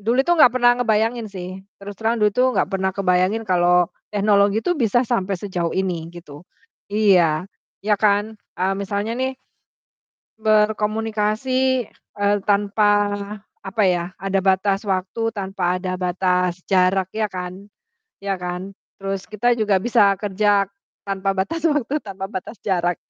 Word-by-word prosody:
dulu 235 Hz, +6 st, +2 dB
itu 310 Hz, -, -2 dB
nggak 255 Hz, -5 st, +7 dB
pernah 245 Hz, -1 st, +4 dB
ngebayangin 225 Hz, 0 st, +1 dB
sih, 185 Hz, -2 st, -7 dB, 0.2 s
terus 200 Hz, 0 st, -8 dB
terang 225 Hz, 0 st, 0 dB
dulu 210 Hz, -, +5 dB
itu 250 Hz, +5 st, +1 dB
nggak -, -, +1 dB
pernah 190 Hz, 0 st, 0 dB
kebayangin 185 Hz, +3 st, +1 dB
kalau 180 Hz, -3 st, +3 dB, 0.2 s
teknologi 205 Hz, +1 st, +3 dB
itu 355 Hz, -3 st, 0 dB
bisa 240 Hz, 0 st, +2 dB
sampai 210 Hz, -6 st, -1 dB
sejauh 180 Hz, -3 st, -3 dB
ini 180 Hz, -4 st, -2 dB
gitu. 165 Hz, -1 st, -12 dB, 0.4 s
Iya, 180 Hz, -6 st, +3 dB, 0.4 s
ya 210 Hz, +1 st, +2 dB
kan. 210 Hz, +1 st, +1 dB, 0.2 s
Eee, 185 Hz, +2 st, +1 dB
misalnya 205 Hz, +4 st, -3 dB
nih 260 Hz, +1 st, -1 dB, 1.0 s
berkomunikasi, 220 Hz, +4 st, +1 dB, 0.3 s
eee, 205 Hz, 0 st, +3 dB
tanpa 205 Hz, +1 st, +2 dB, 0.7 s
apa 200 Hz, +3 st, 0 dB
ya, 175 Hz, -1 st, 0 dB
ada 195 Hz, 0 st, 0 dB
batas 195 Hz, +1 st, +2 dB
waktu, 195 Hz, +3 st, -1 dB
tanpa 190 Hz, -3 st, -2 dB
ada 185 Hz, 0 st, -3 dB
batas 180 Hz, 0 st, 0 dB
jarak, 185 Hz, 0 st, +3 dB
ya 220 Hz, 0 st, +1 dB
kan? 185 Hz, +2 st, -7 dB, 0.5 s
Ya 200 Hz, 0 st, -2 dB
kan? 180 Hz, +2 st, -5 dB, 0.3 s
Terus 195 Hz, -1 st, -4 dB
kita 230 Hz, +3 st, +1 dB
juga 215 Hz, -4 st, +1 dB
bisa 200 Hz, -1 st, +3 dB
kerja 205 Hz, 0 st, +2 dB, 0.4 s
tanpa 195 Hz, 0 st, -2 dB
batas 315 Hz, +13 st, -2 dB
waktu, 295 Hz, -1 st, 0 dB
tanpa 195 Hz, -2 st, -6 dB
batas 190 Hz, +4 st, -6 dB
jarak, 175 Hz, -3 st, 0 dB
200 Hz, 140 wpm, -21 LUFS, 185-220 Hz, 1.0 s, nggak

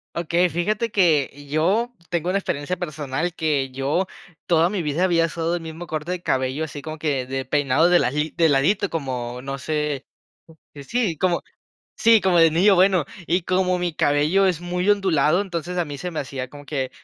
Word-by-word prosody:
Okey. 170 Hz, +1 st, +1 dB
Fíjate, 210 Hz, +7 st, -1 dB
que, 165 Hz, -9 st, +3 dB, 0.2 s
yo 190 Hz, +11 st, +1 dB, 0.2 s
tengo 175 Hz, 0 st, -1 dB
una 195 Hz, -, +1 dB
experiencia 180 Hz, -1 st, -3 dB
personal, 150 Hz, +3 st, -3 dB
que 145 Hz, -6 st, -1 dB
yo 140 Hz, +8 st, 0 dB, 0.4 s
toda 170 Hz, 0 st, +3 dB
mi 190 Hz, -3 st, -2 dB
vida, 150 Hz, +4 st, 0 dB
había 170 Hz, -2 st, +3 dB
usado 165 Hz, +1 st, -2 dB
el 170 Hz, -, -4 dB
mismo 165 Hz, +1 st, -8 dB
corte 155 Hz, +3 st, -4 dB
de 180 Hz, -, -3 dB
cabello, 130 Hz, -1 st, -1 dB
así 145 Hz, -2 st, -8 dB
como 155 Hz, 0 st, -7 dB
que, 140 Hz, -5 st, -1 dB
de 135 Hz, +1 st, -4 dB
peinado 145 Hz, +4 st, +2 dB
de 180 Hz, -, +6 dB
la 125 Hz, -, +1 dB
gi 150 Hz, +2 st, -1 dB
de 165 Hz, -, +5 dB
ladito, 190 Hz, +9 st, +2 dB
como, 125 Hz, -5 st, -4 dB
no 135 Hz, +1 st, -5 dB
sé. 150 Hz, 0 st, -2 dB, 0.8 s
Sí, 210 Hz, -, -1 dB
como 175 Hz, +1 st, 0 dB, 0.5 s
sí, 225 Hz, -1 st, +5 dB
como 185 Hz, -2 st, +3 dB
de 165 Hz, -1 st, +6 dB
niño 190 Hz, +5 st, +4 dB
bueno. 185 Hz, -3 st, +4 dB, 0.2 s
Y 175 Hz, 0 st, +1 dB
como 185 Hz, 0 st, +1 dB
mi 175 Hz, -2 st, -2 dB
cabello 155 Hz, +7 st, +2 dB
es 180 Hz, -4 st, 0 dB
muy 180 Hz, +2 st, -2 dB
ondulado, 185 Hz, -4 st, +3 dB
entonces, 180 Hz, -2 st, -5 dB
a 175 Hz, -, +1 dB
mí 145 Hz, -3 st, -7 dB
se 180 Hz, -, -4 dB
me 160 Hz, -, -3 dB
hacía, 130 Hz, -2 st, -5 dB
como 145 Hz, +1 st, -12 dB
que 135 Hz, -3 st, -3 dB
165 Hz, 195 wpm, -22 LUFS, 145-180 Hz, 0.8 s, de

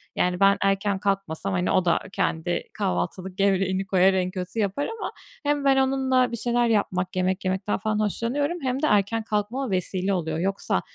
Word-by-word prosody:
Yani 180 Hz, 0 st, +1 dB
ben, 200 Hz, 0 st, +5 dB
erken 195 Hz, 0 st, +1 dB
kalkmasam, 195 Hz, -2 st, -2 dB
hani, 180 Hz, -1 st, 0 dB
o 185 Hz, -, +2 dB
da 170 Hz, -, +3 dB
kendi 175 Hz, -1 st, -1 dB
kahvaltılık 190 Hz, -2 st, -2 dB
gevreğini 195 Hz, -1 st, +1 dB
koyar, 190 Hz, 0 st, +4 dB
en 185 Hz, -1 st, 0 dB
kötü 185 Hz, +3 st, -5 dB
yapar 205 Hz, +7 st, 0 dB
ama, -, -, -3 dB, 0.3 s
hem 290 Hz, -1 st, 0 dB
ben 270 Hz, -1 st, +5 dB
onunla 260 Hz, -2 st, +2 dB
bir 235 Hz, -, -3 dB
şeyler 240 Hz, +1 st, +1 dB
yapmak, 185 Hz, -5 st, 0 dB
yemek 185 Hz, +1 st, 0 dB
yemekten 190 Hz, +2 st, 0 dB
falan 215 Hz, +1 st, -1 dB
hoşlanıyorum, 255 Hz, -, -1 dB
hem 260 Hz, +1 st, -1 dB
de 305 Hz, -, +2 dB
erken 210 Hz, 0 st, +2 dB
kalkmama 220 Hz, +5 st, -2 dB
vesile 185 Hz, +1 st, -1 dB
oluyor. 160 Hz, -3 st, -2 dB
Yoksa, 190 Hz, -, 0 dB
195 Hz, 175 wpm, -25 LUFS, 185-230 Hz, 0.3 s, ben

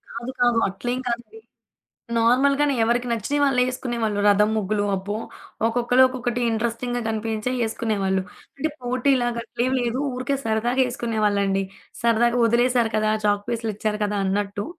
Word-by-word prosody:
కాదు 240 Hz, +2 st, -5 dB
కాదు. 240 Hz, -1 st, +4 dB
అట్లేం 245 Hz, +6 st, -3 dB
కాదండి. 240 Hz, -, -4 dB, 0.8 s
నార్మల్‌గానే 275 Hz, +4 st, +3 dB
ఎవరికి 240 Hz, +2 st, +1 dB
నచ్చినవి 280 Hz, +6 st, -1 dB
వాళ్ళేసుకునేవాళ్ళు. 250 Hz, -5 st, 0 dB
రథం 210 Hz, +1 st, +4 dB
ముగ్గులు, 205 Hz, 0 st, 0 dB
అబ్బో! 200 Hz, +2 st, -3 dB, 0.5 s
ఒక్కొక్కళ్ళు 245 Hz, +2 st, +3 dB
ఒక్కొక్కటి 245 Hz, -1 st, -3 dB
ఇంట్రెస్టింగ్‌గా 235 Hz, +2 st, -2 dB
కనిపించేయి 225 Hz, +3 st, -2 dB
ఏసుకునేవాళ్ళు. 200 Hz, -4 st, -1 dB, 0.3 s
అంటే 315 Hz, +3 st, -1 dB
పోటి 250 Hz, +3 st, 0 dB
లాగ, 240 Hz, -1 st, 0 dB
అట్లేం 245 Hz, +2 st, -2 dB
లేదు 240 Hz, +1 st, -1 dB, 0.2 s
ఊరికే 255 Hz, +2 st, -1 dB
సరదాగా 230 Hz, +4 st, 0 dB
యేసుకునేవాళ్ళండి. 210 Hz, -5 st, 0 dB, 0.4 s
సరదాగా 235 Hz, +1 st, +3 dB
వదిలేసారు 240 Hz, 0 st, +2 dB
కదా! 215 Hz, 0 st, +2 dB
చాక్ 205 Hz, 0 st, +1 dB
పీసులిచ్చారు 215 Hz, -2 st, -2 dB
కదా! 205 Hz, 0 st, -1 dB
అన్నట్టు 200 Hz, +1 st, -1 dB
235 Hz, 125 wpm, -23 LUFS, 215-250 Hz, 0.8 s, కాదు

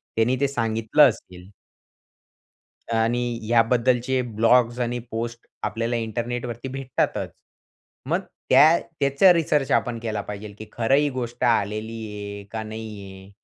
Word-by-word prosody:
त्यांनी 115 Hz, +3 st, +2 dB
ते 140 Hz, -, +3 dB
सांगितलं 115 Hz, +2 st, +3 dB
असतील. 90 Hz, +1 st, -10 dB, 1.4 s
आणि 120 Hz, +1 st, 0 dB
याबद्दलचे 125 Hz, +2 st, +2 dB
ब्लॉग्स 120 Hz, +1 st, +2 dB
आणि 120 Hz, 0 st, -1 dB
पोस्ट 115 Hz, +1 st, -4 dB, 0.2 s
आपल्याला 115 Hz, +3 st, -1 dB
इंटरनेटवरती 120 Hz, +2 st, -4 dB
भेटतातच. 130 Hz, 0 st, -2 dB, 0.8 s
मग -, -, +2 dB, 0.3 s
त्या 160 Hz, +3 st, +7 dB, 0.2 s
त्याचा 140 Hz, +7 st, +5 dB
रिसर्च 150 Hz, -4 st, +1 dB
आपण 120 Hz, -2 st, +1 dB
केला 110 Hz, -3 st, -3 dB
पाहिजे, 105 Hz, +1 st, -7 dB
की 110 Hz, +2 st, -10 dB
खरं 120 Hz, +3 st, +2 dB
ही 145 Hz, 0 st, +3 dB
गोष्ट 120 Hz, -2 st, -5 dB
आलेली 110 Hz, 0 st, 0 dB
आहे 100 Hz, -1 st, -7 dB
का 110 Hz, -1 st, -4 dB
नाही 110 Hz, -1 st, -7 dB
आहे 95 Hz, 0 st, -13 dB
115 Hz, 125 wpm, -24 LUFS, 110-125 Hz, 1.4 s, त्या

